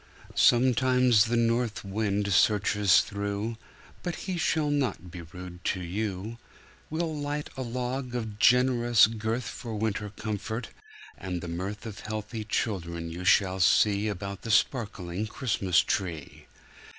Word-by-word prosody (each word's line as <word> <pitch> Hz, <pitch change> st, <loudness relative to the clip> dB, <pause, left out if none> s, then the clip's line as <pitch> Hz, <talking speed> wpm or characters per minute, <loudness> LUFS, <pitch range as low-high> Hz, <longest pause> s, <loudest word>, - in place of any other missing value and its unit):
Sometimes 125 Hz, -2 st, +4 dB
the 120 Hz, +1 st, 0 dB
north 115 Hz, -2 st, 0 dB
wind 100 Hz, 0 st, -1 dB
searches 105 Hz, +1 st, +4 dB
through, 100 Hz, +2 st, -3 dB, 0.4 s
But 175 Hz, -2 st, -3 dB
he 190 Hz, -2 st, -2 dB
shall 160 Hz, -3 st, +1 dB
not 125 Hz, -, -1 dB
be 85 Hz, -, -7 dB
rude 90 Hz, +1 st, -10 dB
to 95 Hz, -, 0 dB
you. 100 Hz, +4 st, -4 dB, 0.5 s
We'll 160 Hz, 0 st, -2 dB
light 145 Hz, 0 st, -4 dB
a 130 Hz, -, -5 dB
log 125 Hz, +1 st, -3 dB
of 110 Hz, -3 st, -4 dB
generous 120 Hz, -1 st, +5 dB
girth 110 Hz, +2 st, -2 dB
For 115 Hz, -3 st, -6 dB
winter 105 Hz, -1 st, -2 dB
comfort, 110 Hz, +2 st, -4 dB, 0.5 s
and 90 Hz, -2 st, -4 dB
the 85 Hz, -, -7 dB
mirth 95 Hz, +6 st, -5 dB
Of 110 Hz, -1 st, -7 dB
healthy 110 Hz, +1 st, -5 dB
children 85 Hz, -6 st, -2 dB
you 85 Hz, +2 st, -6 dB
shall 95 Hz, +1 st, +3 dB
see 100 Hz, +3 st, +4 dB
About 100 Hz, -1 st, -5 dB
a 115 Hz, -, -6 dB
sparkling 105 Hz, -4 st, 0 dB
Christmas 100 Hz, -7 st, +1 dB
tree. 85 Hz, -7 st, -4 dB
110 Hz, 135 wpm, -28 LUFS, 95-120 Hz, 0.5 s, generous